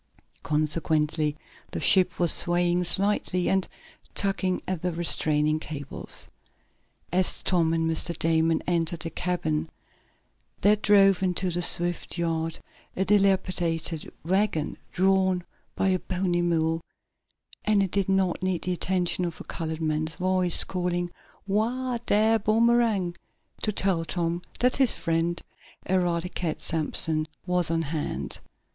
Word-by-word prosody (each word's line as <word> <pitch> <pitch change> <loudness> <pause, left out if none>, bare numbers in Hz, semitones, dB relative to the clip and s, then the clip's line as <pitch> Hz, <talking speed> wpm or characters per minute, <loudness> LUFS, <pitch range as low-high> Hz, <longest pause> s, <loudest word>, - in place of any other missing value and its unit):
Consequently 150 0 0 0.3
the - - -4
ship 185 -2 +4
was 175 -3 +4
swaying 175 0 +2
slightly, 185 -1 0
and 190 -1 +1 0.5
tugging 190 -2 +1
at 185 -3 -2
the 180 - -1
restraining 155 -2 +2
cables. 145 -3 -4 0.8
As 185 +1 +1
Tom 170 -3 +2
and 165 0 0
Mr. 165 +1 -1
Damon 160 0 +2
entered 170 -1 0
the 165 - -3
cabin 160 -3 -2 0.9
there 205 +1 +5
drove 195 -2 +4
into 185 0 0
the 175 +1 -1
Swift 175 0 +1
yard 165 -1 -1 0.4
a 190 - 0
dilapidated 185 -5 +1
wagon, 185 -4 0 0.2
drawn 190 -1 +2 0.3
by 195 - +1
a 185 -1 +1
bony 180 -1 -1
mule, 165 -1 +1 0.8
and 210 -2 +3
it 190 - -3
did 195 -1 0
not 190 -2 +1
need 185 -2 -1
the 180 - -1
addition 180 0 -1
of 170 -2 -4
a - - -7
colored 160 -1 -5
man's 155 +1 -1
voice, 185 -1 +1
calling: 175 -1 -2 0.3
"Whoa, 235 +5 -1
dar, 220 +2 +3
Boomerang!" 220 -4 +2 0.5
to 215 - +1
tell 190 -4 0
Tom 170 0 -2 0.2
that 250 +1 +3
his 265 -4 +4
friend 165 +1 -1 0.5
Eradicate 175 -2 -1
Sampson 155 -1 +1 0.2
was 180 -2 +3
on 165 0 0
hand. 145 - -3
175 Hz, 125 wpm, -26 LUFS, 165-190 Hz, 0.9 s, there